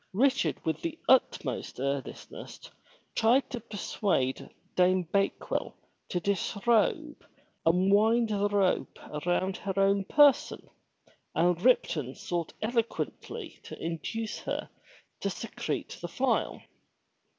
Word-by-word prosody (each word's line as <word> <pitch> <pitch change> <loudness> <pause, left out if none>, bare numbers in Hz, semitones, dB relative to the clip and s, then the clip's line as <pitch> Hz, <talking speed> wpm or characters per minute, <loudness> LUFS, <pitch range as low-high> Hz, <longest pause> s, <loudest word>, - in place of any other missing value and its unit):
Richard 265 +6 +2
with 160 - -1
the 330 -1 -3
utmost 155 - +2
earnestness 140 0 -5 0.4
tried 245 +5 +3
to 245 - -3
persuade 200 - -1 0.3
Dame 185 0 +4
Bakewell 195 +4 -1 0.3
to 180 - 0
disrobe 220 - +1 0.4
and 185 +4 +4
wind 225 +3 +4
the 205 -1 +1
rope 200 -3 +1
around 175 +5 0
her 195 -1 -4
own 195 0 +3
person, 290 +4 +4 0.7
and 175 +1 +2
Ripton 155 - +2
sought 170 -2 -3
eloquently 230 0 -3
to - - -9
induce 210 +7 -4
her - - -3 0.5
to - - -1
secrete - - -4
the - - -3
file. - - 0
200 Hz, 105 wpm, -29 LUFS, 175-230 Hz, 0.7 s, Dame